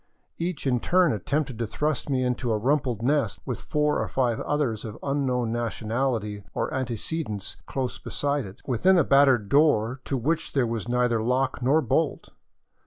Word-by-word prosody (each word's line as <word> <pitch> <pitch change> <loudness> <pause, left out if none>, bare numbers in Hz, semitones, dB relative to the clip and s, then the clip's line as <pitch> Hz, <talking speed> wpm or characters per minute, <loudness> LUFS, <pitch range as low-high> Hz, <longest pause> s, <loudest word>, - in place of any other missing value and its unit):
Each 170 -2 -3
in 125 -2 +2
turn 180 +3 +3
attempted 130 - -2
to 115 - -1
thrust 150 +5 -2
me 130 -2 +1
into 125 -1 -1
a 110 - +2
rumpled 125 -1 0
nest, 135 -5 +1
with - - -4
four 150 0 +1
or - - -2
five 120 -4 0
others 135 -8 -1
of 110 -1 -7
unknown 130 -4 0
national 120 +2 -1
ity 105 -1 -6
or - - -1
antecedents 125 - -3
close 130 -2 -3
beside 145 -4 -2
it, 95 - -14
within 180 +10 +3
a 170 - +5
battered 135 -6 +4
door 130 -3 +3
to 135 - -1
which 155 +7 -1
there 135 -3 +2
was 115 -1 -3
neither 125 -2 +2
lock 130 +2 0
nor 145 +6 +3
bolt. 115 - 0
130 Hz, 175 wpm, -26 LUFS, 115-145 Hz, -, a